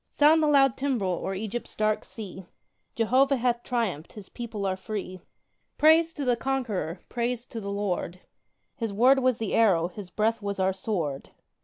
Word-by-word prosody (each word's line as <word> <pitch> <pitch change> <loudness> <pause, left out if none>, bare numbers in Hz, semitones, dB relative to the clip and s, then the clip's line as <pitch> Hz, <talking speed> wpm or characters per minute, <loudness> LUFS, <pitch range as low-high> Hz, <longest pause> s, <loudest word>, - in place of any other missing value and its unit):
Sound 310 +2 +5
the 305 - +3
loud 270 -3 +4
timbrel 250 -9 0
o'er 195 - -2
Egypt's 220 +4 -5
dark 215 0 +1
sea! 190 -4 -9 0.5
Jehovah 260 +5 +3
hath 240 -1 0
triumphed 220 -12 -2
His 205 -3 -11
people 225 -4 -5
are 190 -1 0
free. 190 -2 -6 0.6
Praise 320 +2 +5
to 285 - -4
the 245 -1 +3
Conqueror, 235 -9 -2
praise 240 0 -2
to 230 - -7
the 200 - -5
Lord! 195 -3 -2 0.6
His 225 -3 -3
word 250 +7 +5
was 255 -2 +2
the 220 -3 -3
arrow, 180 -7 +3
His 190 0 -9
breath 220 +4 0
was 200 -1 -3
our 190 0 +2
sword! 180 -8 -3
220 Hz, 170 wpm, -27 LUFS, 190-250 Hz, 0.6 s, Sound